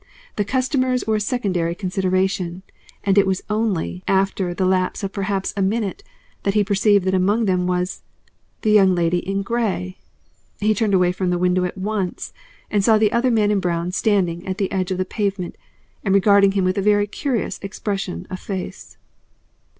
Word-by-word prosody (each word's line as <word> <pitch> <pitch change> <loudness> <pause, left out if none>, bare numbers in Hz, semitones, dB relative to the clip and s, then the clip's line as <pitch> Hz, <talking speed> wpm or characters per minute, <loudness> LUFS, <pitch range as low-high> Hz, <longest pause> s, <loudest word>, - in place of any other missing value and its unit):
The 205 - +1
customers 255 +2 0
were 220 -1 +1
a - - -1
secondary 190 -7 -1
consideration, 185 -1 -1 0.4
and 200 0 +4
it 195 - +3
was 190 0 -1
only 200 -4 -1
after 190 -1 +1
the 185 +2 -1
lapse 185 +1 0
of 195 - -3
perhaps 195 -1 -2
a 200 - -1
minute 205 - -1 0.4
that 200 0 -1
he 210 - +4
perceived 200 -1 +3
that 190 - +1
among 200 +5 +2
them 180 -2 +1
was 180 0 -1 0.6
the 215 - +3
Young 195 -3 +5
Lady 175 0 +1
in 195 +2 -2
Grey! 195 -5 -2 0.6
He 215 +1 +2
turned 210 -2 +1
away 180 -1 +3
from 185 0 -2
the 175 - +1
window 180 +1 +2
at 180 - -5
once, 195 -1 -3 0.4
and 205 -2 +2
saw 220 +1 +5
the 215 -1 +3
other 240 +2 +2
man 215 -3 +2
in 205 - +2
brown 175 -1 -1
standing 180 -4 +1
at 190 0 -2
the 195 -3 -1
edge 185 -2 -1
of 185 - -1
the 185 - -1
pavement 195 -3 -3 0.5
and 195 -2 +2
regarding 200 0 +5
him 195 -2 +1
with 185 +2 +1
a - - +1
very 205 0 +3
curious 225 -2 -2
expression 195 - -4
of 185 - -4
face. 190 -2 -6
195 Hz, 185 wpm, -21 LUFS, 185-210 Hz, 0.6 s, Young